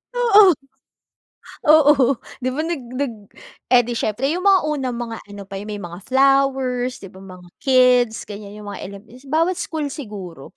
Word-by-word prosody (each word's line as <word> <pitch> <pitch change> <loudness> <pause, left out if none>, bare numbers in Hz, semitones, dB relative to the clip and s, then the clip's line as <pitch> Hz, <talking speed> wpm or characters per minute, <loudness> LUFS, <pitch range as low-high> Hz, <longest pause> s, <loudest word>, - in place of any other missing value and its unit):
Oo. 425 -6 +6 1.1
Oo, 290 -4 +5 0.2
'di 255 - -3
ba, 310 - -1
nag 330 -2 -3 0.2
nag 275 -3 -2 0.5
Eh, 250 -1 +5
'di 240 - -6
siyempre 240 +4 -1
'yung 365 +4 -1
mga 390 -2 +5
unang 270 -5 -2
mga 230 -1 -5
ano 205 -1 -9
pa, 195 0 -8
'yung 210 - -9
may 205 -1 -6
mga 175 0 -8
flowers, 265 -3 +1
'di 195 - -10
ba, 190 - -14
mga 185 -2 -13
kids 250 -4 +3
ganyan, 205 0 -10
'yung 210 -1 -10
mga - - -8
element 210 +5 -13
bawat 330 +5 +1
school 320 -3 -4
siguro. 195 - -9
250 Hz, 170 wpm, -20 LUFS, 205-290 Hz, 1.1 s, Oo